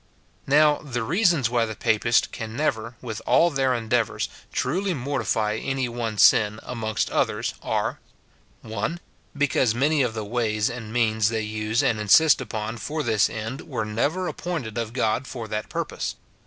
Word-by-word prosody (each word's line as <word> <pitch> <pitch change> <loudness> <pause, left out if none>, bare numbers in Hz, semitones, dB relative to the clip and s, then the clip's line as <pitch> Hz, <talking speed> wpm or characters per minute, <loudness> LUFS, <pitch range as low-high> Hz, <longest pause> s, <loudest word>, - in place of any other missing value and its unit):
Now, 150 +1 +5
the 120 -5 -4
reasons 170 - +2
why 120 -1 +1
the 110 - -5
Papists 115 +3 +2
can 110 -1 -7
never, 115 -6 -1
with 115 -3 -5
all 170 +1 +5
their 135 -3 +1
endeavours, 115 -1 0 0.2
truly 180 +7 -1
mortify 120 -5 -1
any 135 -2 -1
one 115 -2 -4
sin, 105 +1 +5
amongst 115 -2 -2
others, - - 0
are, - - -1 0.3
— - - -35
(1.) 110 +10 -3 0.4
Because 130 -5 +2
many 145 +4 +2
of 120 -4 0
the 110 -1 -3
ways 110 -1 0
and 115 -3 -7
means 110 -2 +2
they 110 -1 -1
use 110 +1 -1
and 110 - +1
insist 140 +9 +5
upon 110 -1 -4
for 150 +6 -3
this 110 -4 +2
end 110 +5 -5
were 120 -7 -2
never 145 +13 -1
appointed 155 -12 -4
of 115 -2 -3
God 125 +1 0
for 120 -4 -6
that 105 0 -3
purpose. - - -3
115 Hz, 165 wpm, -24 LUFS, 110-135 Hz, 0.4 s, Now